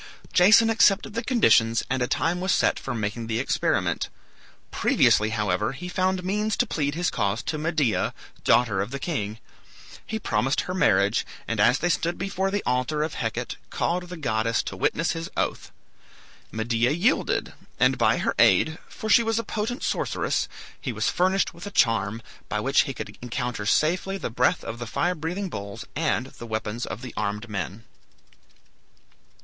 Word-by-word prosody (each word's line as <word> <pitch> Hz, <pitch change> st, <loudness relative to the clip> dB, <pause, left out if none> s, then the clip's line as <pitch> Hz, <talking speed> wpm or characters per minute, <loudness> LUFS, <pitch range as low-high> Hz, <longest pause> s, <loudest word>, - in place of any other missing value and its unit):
Jason 205 Hz, +5 st, +7 dB
accepted 215 Hz, -2 st, +3 dB
the 230 Hz, +2 st, -2 dB
conditions, 115 Hz, -, +4 dB
and 130 Hz, 0 st, -1 dB
a 125 Hz, -, +1 dB
time 175 Hz, +6 st, 0 dB
was 190 Hz, -, +1 dB
set -, -, +2 dB
for 125 Hz, -, -4 dB
making 110 Hz, +1 st, -3 dB
the 110 Hz, -1 st, -1 dB
experiment. 130 Hz, -, 0 dB, 0.6 s
Previously, 105 Hz, +1 st, +3 dB
however, 105 Hz, 0 st, 0 dB
he 170 Hz, +7 st, -7 dB
found 185 Hz, 0 st, 0 dB
means 210 Hz, +3 st, 0 dB
to 245 Hz, -, +3 dB
plead 145 Hz, -8 st, -1 dB
his 175 Hz, +1 st, 0 dB
cause 100 Hz, +2 st, -1 dB
to 155 Hz, -, -3 dB
Medea, 155 Hz, -7 st, 0 dB, 0.3 s
daughter 110 Hz, -6 st, +3 dB
of 100 Hz, -, -3 dB
the 140 Hz, -, -4 dB
king. 110 Hz, -, -3 dB, 0.7 s
He 220 Hz, -, -4 dB
promised 135 Hz, -, 0 dB
her 180 Hz, -, -5 dB
marriage, 100 Hz, -, +3 dB, 0.2 s
and 115 Hz, -2 st, -2 dB
as 120 Hz, +5 st, +5 dB
they 175 Hz, -, 0 dB
stood 170 Hz, +1 st, 0 dB
before 195 Hz, +1 st, -1 dB
the 205 Hz, +1 st, -2 dB
altar 130 Hz, +5 st, 0 dB
of 155 Hz, -, -3 dB
Hecate, 115 Hz, -2 st, -3 dB
called 175 Hz, +1 st, -1 dB
the 180 Hz, -, -7 dB
goddess 115 Hz, -5 st, 0 dB
to -, -, -5 dB
witness 165 Hz, -, 0 dB
his 165 Hz, 0 st, -4 dB
oath. -, -, -2 dB, 0.8 s
Medea 115 Hz, +2 st, +1 dB
yielded, 180 Hz, -, +1 dB, 0.3 s
and -, -, +3 dB
by -, -, +3 dB
her -, -, 0 dB
aid, 160 Hz, +1 st, +4 dB
for 220 Hz, -, -7 dB
she 235 Hz, -, +6 dB
was 225 Hz, -1 st, 0 dB
a 230 Hz, -, 0 dB
potent 225 Hz, +4 st, -3 dB
sorceress, -, -, -1 dB, 0.3 s
he -, -, -3 dB
was -, -, 0 dB
furnished 190 Hz, +2 st, +1 dB
with 175 Hz, +4 st, -9 dB
a -, -, -3 dB
charm, 115 Hz, -, +1 dB, 0.3 s
by -, -, -1 dB
which -, -, +3 dB
he -, -, -4 dB
could -, -, -8 dB
encounter 120 Hz, -3 st, -3 dB
safely 180 Hz, -, +1 dB
the 155 Hz, -, -4 dB
breath 125 Hz, +2 st, +2 dB
of 115 Hz, +1 st, -6 dB
the 120 Hz, -, -5 dB
fire 175 Hz, +10 st, 0 dB
breathing 175 Hz, +5 st, -3 dB
bulls 100 Hz, -, -7 dB
and 150 Hz, -5 st, 0 dB
the 120 Hz, -, -7 dB
weapons 110 Hz, +1 st, -3 dB
of 105 Hz, +7 st, -6 dB
the 125 Hz, -, -7 dB
armed 105 Hz, +2 st, -2 dB
men. 100 Hz, +1 st, -5 dB
140 Hz, 175 wpm, -25 LUFS, 115-180 Hz, 0.8 s, Jason